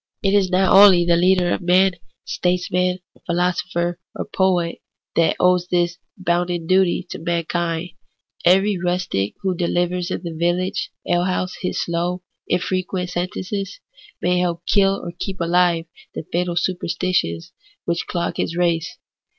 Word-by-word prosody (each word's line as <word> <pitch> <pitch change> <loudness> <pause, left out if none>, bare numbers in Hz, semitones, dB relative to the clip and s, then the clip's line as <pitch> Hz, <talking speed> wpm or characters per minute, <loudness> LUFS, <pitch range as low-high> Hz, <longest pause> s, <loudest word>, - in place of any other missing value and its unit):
It 195 0 +2
is 200 -2 +3
not 190 +1 +3
only 190 -3 +8
the 170 0 +4
leader 180 0 +3
of - - -2
men, 185 +2 +4 0.3
statesman, 180 0 0 0.3
philo 175 +1 +2
sopher, 175 -1 -3 0.2
or - - -4
poet, 180 -3 0 0.4
that 165 -1 +3
owes 180 -1 +3
this 175 0 0 0.2
bounden 175 -2 -1
duty 185 0 +2
to - - -5
man 170 0 -1
kind. 170 0 -2 0.5
Every 195 +2 +4
rustic 175 - -1
who 190 -1 0
delivers 175 +1 0
in - - -4
the 170 -2 -5
village 175 +3 -1 0.2
alehouse 180 +1 0
his 180 - -2
slow, 175 +2 -2 0.2
infrequent 185 0 -1
sentences, 185 - -4 0.4
may 180 0 +2
help 175 -1 -1
to - - 0
kill 195 -1 +3
or 170 - -5
keep 190 0 -4
ahve 170 -1 +2 0.3
the - - -4
fatal 175 0 -1
superstitions 175 - -1 0.3
which 170 0 -2
clog 170 -1 -2
his 170 - -2
race. 170 -2 0
180 Hz, 145 wpm, -21 LUFS, 170-185 Hz, 0.5 s, only